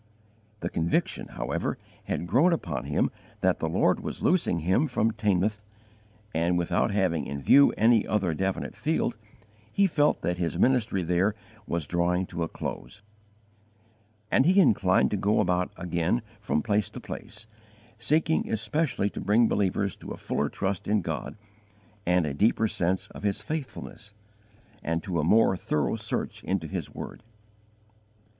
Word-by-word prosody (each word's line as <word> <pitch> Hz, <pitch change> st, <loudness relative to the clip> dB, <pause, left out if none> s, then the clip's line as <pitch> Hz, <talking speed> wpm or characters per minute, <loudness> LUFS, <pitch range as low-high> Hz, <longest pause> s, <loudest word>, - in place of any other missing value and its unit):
The -, -, -2 dB
conviction, 85 Hz, +1 st, 0 dB
however, -, -, -3 dB, 0.3 s
had -, -, -2 dB
grown 140 Hz, -, +4 dB
upon 75 Hz, -, -3 dB
him 75 Hz, -, +1 dB, 0.3 s
that -, -, +2 dB
the -, -, -1 dB
Lord -, -, +2 dB
was -, -, -6 dB
loosing 160 Hz, -, +2 dB
him 95 Hz, -, +2 dB
from 115 Hz, -4 st, +1 dB
Teignmouth, 105 Hz, -1 st, 0 dB, 0.7 s
and, 85 Hz, +2 st, +1 dB
without 85 Hz, +3 st, +1 dB
having 90 Hz, -7 st, 0 dB
in 70 Hz, 0 st, -4 dB
view 140 Hz, -, +6 dB
any 115 Hz, 0 st, +4 dB
other 95 Hz, -6 st, +1 dB
definite 95 Hz, +4 st, -2 dB
field, 155 Hz, -6 st, 0 dB, 0.6 s
he 200 Hz, -, +3 dB
felt 150 Hz, -5 st, +2 dB
that 90 Hz, 0 st, -1 dB
his 85 Hz, -1 st, -1 dB
ministry 110 Hz, -5 st, +2 dB
there 90 Hz, +5 st, +1 dB, 0.3 s
was 85 Hz, -3 st, -2 dB
drawing 90 Hz, +3 st, +1 dB
to 85 Hz, -, -3 dB
a 85 Hz, -, 0 dB
close; 100 Hz, +4 st, -7 dB, 1.3 s
and 135 Hz, -, +4 dB
he 190 Hz, +3 st, +5 dB
inclined 105 Hz, -, +4 dB
to 105 Hz, -, 0 dB
go 100 Hz, +3 st, +2 dB
about 90 Hz, -2 st, +1 dB
again 85 Hz, +6 st, 0 dB, 0.2 s
from 90 Hz, -8 st, -1 dB
place 105 Hz, -2 st, +1 dB
to -, -, -8 dB
place, 105 Hz, +1 st, -8 dB, 0.5 s
seeking 155 Hz, +7 st, +1 dB
especially 125 Hz, 0 st, 0 dB
to -, -, -6 dB
bring 115 Hz, +3 st, +4 dB
believers 100 Hz, -1 st, 0 dB
to -, -, -10 dB
a -, -, -6 dB
fuller -, -, -1 dB
trust 95 Hz, 0 st, -3 dB
in 105 Hz, 0 st, +2 dB
God 80 Hz, +3 st, -4 dB, 0.7 s
and 90 Hz, -1 st, +3 dB
a 75 Hz, -, -2 dB
deeper 110 Hz, +7 st, +2 dB
sense 95 Hz, -1 st, 0 dB
of -, -, -10 dB
His 100 Hz, 0 st, 0 dB
faithfulness, 115 Hz, -5 st, -6 dB, 0.7 s
and 80 Hz, 0 st, -2 dB
to 90 Hz, -5 st, -2 dB
a -, -, +1 dB
more 105 Hz, +4 st, +4 dB
thorough 75 Hz, -6 st, -1 dB
search -, -, -4 dB
into 95 Hz, -3 st, -1 dB
His 80 Hz, -, -4 dB
word. -, -, -8 dB
95 Hz, 155 wpm, -27 LUFS, 85-110 Hz, 1.3 s, view